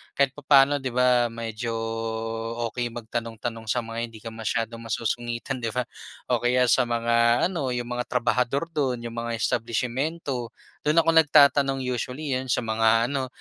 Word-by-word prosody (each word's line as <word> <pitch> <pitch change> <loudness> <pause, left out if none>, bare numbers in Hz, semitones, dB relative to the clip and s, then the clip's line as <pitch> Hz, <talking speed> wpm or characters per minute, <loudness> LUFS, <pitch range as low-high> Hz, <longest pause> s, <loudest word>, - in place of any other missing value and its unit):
kahit 140 -1 +3
papaano 140 0 +4
'di 130 -3 -5
ba, 125 -1 +4
medyo 115 0 -4 1.0
okey 120 +1 -2
magtanong-tanong 115 0 -5
sa 120 +3 0
mga 115 0 -6
hindi 115 -1 -5
ka 115 - -6
masyadong 115 +1 -3
masusungitan, 120 +2 -3
di 115 - -3
ba? 125 - +1 0.5
O 120 - +3
kaya 125 +1 +2
sa 125 -2 +3
mga 115 0 +2
ano, 160 -7 -2
yung 120 -1 -3
mga 125 - -3
trabahador 125 +3 +1
do'n, 130 -6 -1
yung 115 - -5
mga 115 0 -3
establisimyento. 125 +4 -2 0.4
Do'n 155 +3 +5
ako - - +3
nagtatanong 140 -3 +5
usually, 125 +4 -3
'yon 130 - -4
sa 125 - +1
mga 115 +1 +2
ano 135 -2 -1
120 Hz, 155 wpm, -25 LUFS, 115-130 Hz, 1.0 s, Do'n